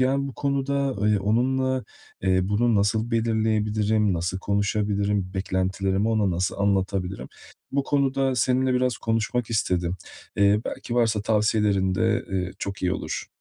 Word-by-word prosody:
yani, 135 Hz, +2 st, +1 dB
bu 135 Hz, -, -8 dB
konuda 140 Hz, -1 st, -1 dB
ıy 105 Hz, 0 st, +3 dB
onunla, 130 Hz, +5 st, +1 dB, 0.4 s
eee, 95 Hz, 0 st, +3 dB
bunu 105 Hz, +5 st, +1 dB
nasıl 110 Hz, +3 st, +1 dB
belirleyebilirim? 110 Hz, -2 st, +1 dB
Nasıl 85 Hz, +2 st, -2 dB
konuşabilirim? 100 Hz, -1 st, 0 dB
Beklentilerimi 95 Hz, +2 st, 0 dB
ona 105 Hz, -4 st, +2 dB
nasıl 90 Hz, +2 st, -1 dB
anlatabilirim? 95 Hz, -1 st, -1 dB, 0.4 s
Bu 140 Hz, -, +1 dB
konuda 135 Hz, -2 st, +1 dB
seninle 130 Hz, +2 st, +2 dB
biraz 125 Hz, -1 st, +1 dB
konuşmak 115 Hz, +1 st, -1 dB
istedim. 90 Hz, -5 st, 0 dB, 0.4 s
Eee, 100 Hz, +1 st, +4 dB
belki 120 Hz, -, -5 dB
varsa 110 Hz, -4 st, +2 dB
tavsiyelerin 105 Hz, -3 st, +2 dB
de, 115 Hz, +3 st, +1 dB
eee, 95 Hz, -1 st, -2 dB
çok 100 Hz, -1 st, -5 dB
iyi 90 Hz, 0 st, +1 dB
olur. -, -, -4 dB
105 Hz, 135 wpm, -25 LUFS, 95-120 Hz, 0.4 s, Eee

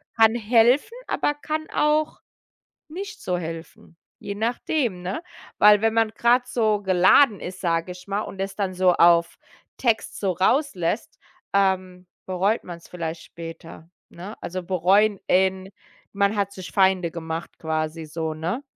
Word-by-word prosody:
kann 225 Hz, 0 st, +5 dB
helfen, 240 Hz, -, +3 dB
aber 295 Hz, -, 0 dB
kann 310 Hz, +1 st, -4 dB
auch 300 Hz, +1 st, +1 dB, 0.7 s
nicht 400 Hz, +6 st, -8 dB
so 180 Hz, -1 st, -1 dB
helfen, 165 Hz, 0 st, -9 dB, 0.2 s
je 200 Hz, -, -6 dB
nachdem, 230 Hz, -, -1 dB
ne? 190 Hz, -, -4 dB, 0.4 s
Weil 210 Hz, 0 st, +7 dB
wenn 225 Hz, 0 st, +2 dB
man 225 Hz, -1 st, +2 dB
grad 245 Hz, +2 st, +2 dB
so 215 Hz, -4 st, +1 dB
geladen 190 Hz, +5 st, +5 dB
ist, 185 Hz, +1 st, -8 dB
sage 170 Hz, 0 st, -1 dB
ich 180 Hz, +2 st, -14 dB
mal, 200 Hz, +2 st, -1 dB
und 190 Hz, -, -8 dB
es 195 Hz, 0 st, -4 dB
dann 190 Hz, -3 st, -2 dB
so 180 Hz, 0 st, +4 dB
auf 170 Hz, 0 st, +4 dB, 0.4 s
Text 230 Hz, -3 st, -1 dB
so 195 Hz, -3 st, 0 dB
rauslässt, 190 Hz, -, 0 dB, 0.4 s
ähm, 185 Hz, -2 st, 0 dB, 0.2 s
bereut 190 Hz, +4 st, 0 dB
man's 170 Hz, -1 st, -10 dB
vielleicht 165 Hz, -2 st, -5 dB
später, 165 Hz, 0 st, -11 dB, 0.2 s
ne? 190 Hz, +5 st, -9 dB
Also 185 Hz, 0 st, -5 dB
bereuen 190 Hz, +3 st, +2 dB
in 190 Hz, +1 st, +1 dB, 0.4 s
man 200 Hz, +1 st, +1 dB
hat 200 Hz, -1 st, -1 dB
sich 185 Hz, -1 st, -9 dB
Feinde 190 Hz, -3 st, +2 dB
gemacht 165 Hz, 0 st, -6 dB
quasi 160 Hz, 0 st, -3 dB
so, 160 Hz, 0 st, -4 dB
ne? 175 Hz, -, -3 dB
190 Hz, 145 wpm, -23 LUFS, 175-225 Hz, 0.7 s, Weil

